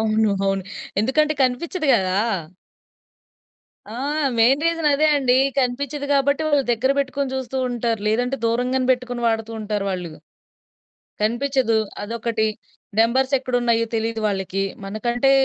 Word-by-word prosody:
అవును. 220 -1 +2
అవును. 195 -1 0 0.4
ఎందుకంటే 300 +7 +2
కనిపించదు 300 +6 -1
గదా! 190 -3 +1 1.8
ఆ! - - -7 0.4
మెయిన్ 265 +6 +4
రీజన్ 330 -2 0
అదే 295 +2 +3
అండి. 255 -2 +3 0.2
కనిపించదు 280 +3 -1
గాబట్టి 280 +2 +2
వాళ్ళు 290 -2 +3
దగ్గర 245 +4 +1
పెట్టుకొని 275 -1 -1
చూస్తూంటారు. 245 -3 -2
లేదంటే 245 +5 0
దూరంగానే 250 +2 0
పెట్టుకొని 245 -1 -4
వాడుతూంటారు 220 -2 -2
వాళ్ళు. 180 -3 -4 1.1
కనిపించదు. 240 +1 +1 0.2
అదొకటి 225 0 -1 0.5
నంబర్స్ 260 +4 +3
ఎక్కడ 255 -1 -5
ఉన్నాయో 230 -1 +2
తెలీదు 225 0 -1
వాళ్ళకి. 195 -1 -2 0.2
మనకంటే 240 +6 0
245 Hz, 115 wpm, -22 LUFS, 220-270 Hz, 1.8 s, మెయిన్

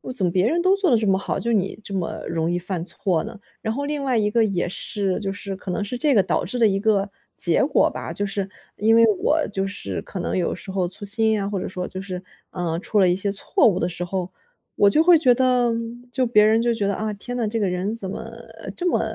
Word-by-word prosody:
怎 200 - -2
么 175 - +1
别 185 +4 +2
人 335 +7 +1
都 375 +2 +4
做 390 -7 +1
得 235 - +5
这 215 -2 -1
么 190 - +3
好， 195 - -3
就 235 - -1
你 195 -2 0
这 - - -7
么 185 -3 -3
容 165 0 -1
易 175 - 0
犯 180 -1 -4
错 180 -3 -1
呢？ - - -9 0.2
然 220 0 -2
后 285 +3 -3
另 295 -1 -3
外 260 -2 0
一 210 -1 +2
个 225 +1 +3
也 185 -4 -1
是， 195 0 -1
就 195 -2 -3
是 200 -1 -5
可 190 0 -6
能 205 - -1
是 225 +5 -4
这 290 +1 +2
个 205 - +5
导 - - -1
致 245 +8 -3
的 225 - +6
一 195 -1 +1
个 205 -1 +1 0.3
结 - - +3
果 - - +3
吧。 - - -6
就 205 - -2
是 200 -1 -2 0.3
因 220 +2 +3
为 230 - +6 0.2
我 315 - +3
就 195 -1 -1
是 195 - -4
可 190 - -7
能 - - -2
有 175 - 0
时 - - -8
候 190 -2 0
粗 205 +4 -7
心 220 +1 +3
啊， 195 - -2
或 200 - -2
者 - - -4
说 180 -1 -4
就 190 - -7
是， 185 -2 -5 0.3
啊 170 -3 -2
出 205 +4 0
了 185 - +5
一 175 - +2
些 195 +1 -1
错 195 - +2
误 185 -4 +2
的 170 - 0
时 175 0 -4
候， 185 0 -3 0.4
我 205 - +4
就 310 - +5
会 345 -1 +7
觉 260 -5 +4
得 250 -1 +2 0.4
就 260 +1 0
别 210 -2 +5
人 220 +1 +4
就 240 0 +1
觉 225 -3 -1
得， 200 - 0
啊 215 +2 -2
天 245 +5 -7
哪， 235 -3 -1
这 225 +2 -2
个 205 - +1
人 185 +4 -2
怎 205 -4 -5
么 - - -7 0.4
这 360 - -1
么 - - +2
205 Hz, 290 characters per minute, -23 LUFS, 190-230 Hz, 0.4 s, 会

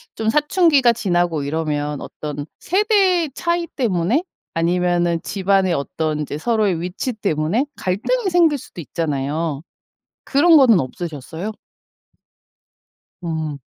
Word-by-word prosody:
좀 220 0 -1
사춘기가 295 -2 +4
지나고 175 -7 0
이러면 150 -1 -2
어떤 145 -1 -6
세대 380 -4 +2
차이 340 +2 -1
때문에 225 - 0 0.3
아니면은 175 0 +1
집안에 195 -2 +1
어떤 155 +1 -2
인제 150 0 -4
서로의 205 -3 0
위치 180 +8 -3
때문에 200 - 0
갈등이 380 - -1
생길 335 -4 +4
수도 180 -8 -10
있잖아요. 150 -1 -2 0.6
그런 320 +4 +5
거는 245 -8 +6
없으셨어요? 160 +7 -5 1.7
음. 160 -3 -3
180 Hz, 260 characters per minute, -20 LUFS, -, 1.7 s, 거는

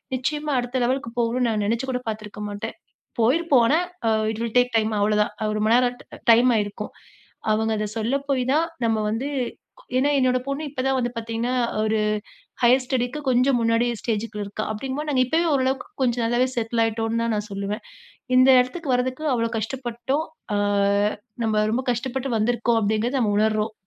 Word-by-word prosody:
நிச்சயமா, 295 +4 -2
அடுத்த 245 +1 -2
லெவலுக்கு 250 -1 -1
போகணும்னு 240 +1 +1
நான் 210 -2 0
நினைச்சி 235 +4 0
கூட 250 - -1
பாத்துருக்க 210 -1 -6
மாட்டேன். 205 0 -5 0.5
போயிருப்போம் 270 +2 +4
ஆனா, 305 +7 +3 0.5
இட் 220 - -6
வில் 230 0 -4
டேக் 245 -1 +3
டைம் 220 0 +1
அவ்ளோதான். 210 0 +2
அ - - 0
ரொம்பநேரம் 245 +3 +3
ட - - -18 0.3
டைம் 240 +2 +6
ஆயிருக்கும். 205 -1 -3 0.6
அவுங்க 220 +1 0
அத 210 - -1
சொல்ல 230 +5 0
போய் 260 -3 +1
தான், 320 +3 +2 0.2
நம்ப 225 -1 +2
வந்து 250 +6 -2 0.7
ஏன்னா, 280 +3 +3
என்னோட 255 -1 +2
பொண்ணு 275 +2 -2
இப்ப 270 -2 -4
தான் 265 0 +2
வந்து 240 -1 -1
பாத்தீங்கன்னா, 230 +2 -2 0.3
ஒரு 220 0 +1 0.6
ஹையர் 250 +2 +5
ஸ்டடிக்கு 250 +1 -1
கொஞ்சம் 255 +1 +3
முன்னாடி 230 +1 +2
ஸ்டேஜுக்குள்ள 215 -2 -3
இருக்கா. 205 +2 -4
அப்டிங்கும்போது, 270 +7 -4
நாங்க 255 -2 +3
இப்போவே, 320 +6 +1
ஓரளவுக்கு 265 0 0 0.2
கொஞ்சம் 240 -2 +1
நல்லாவே 240 +2 +2
செட்டில் 230 0 0
ஆயிட்டோம்னு 225 +1 -1
தான் 230 - 0
நான் 210 0 -4
சொல்லுவேன். 200 +2 -4 0.5
இந்த 255 +1 +6
இடத்துக்கு 275 +5 -2
வரதுக்கு 255 +4 -1
அவ்ளோ 230 -1 0
கஷ்டப்பட்டோம். 250 +5 -2 0.3
அ - - +1 0.9
நம்ப 215 -1 +2
ரொம்ப 250 +4 0
கஷ்டப்பட்டு 260 +2 -3
வந்துருக்கோம். 235 +1 +1
அப்பிடீங்கிறத 220 +5 0
நம்ம 210 -4 +1
உணர்றோம். 215 0 +1
240 Hz, 165 wpm, -23 LUFS, 220-260 Hz, 0.9 s, டைம்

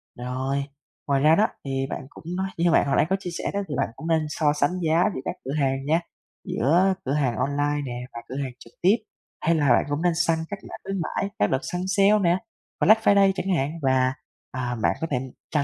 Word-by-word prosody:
Rồi, 130 +3 -2 0.4
ngoài 140 -1 +2
ra 155 +3 +6
đó 215 +4 +4 0.2
thì 135 -1 -1
bạn - - -4
cũng - - -14
nói 190 0 -1
như 170 0 +3
bạn 145 - +4
hồi 135 - +2
nãy - - +4
có 190 - +3
chia 185 - -5
sẻ 170 - -3
đó 200 - 0
thì 145 - -4
bạn - - 0
cũng 160 - -7
nên 160 -2 +2
so 150 0 +1
sánh 150 +5 0
giá 165 +1 +3
giữa 130 - -4
các - - -2
cửa 135 - -3
hàng 135 0 0
nha, 160 +3 +3 0.5
giữa 175 +9 +3
cửa 135 - 0
hàng 135 -6 +1
online 145 +1 0
nè 125 0 -5
và 115 - -6
cửa 130 - -6
hàng 130 - -4
trực 115 - -15
tiếp. 190 +5 +5 0.5
Hay 165 +1 +4
là 145 -3 +2
bạn - - +5
cũng 145 +2 -1
nên 175 0 +2
săn 165 -1 +2
các 200 -1 -5
giảm - - -9
khuyến 195 -1 -3
mãi, 195 +4 -2
các 105 - +4
đợt 130 - +2
săn 180 - -4
sale 200 +1 +4
nè, 175 0 +3 0.4
Black 220 +1 +6
Friday 200 -2 +5
chẳng 190 -2 0
hạn 140 -1 0
và, 130 -1 +2 0.4
ờ, 125 -1 -3
bạn - - +2
có 165 - -1
thể 125 - +2 0.3
tra 150 - +2
150 Hz, 240 wpm, -25 LUFS, 135-180 Hz, 0.5 s, ra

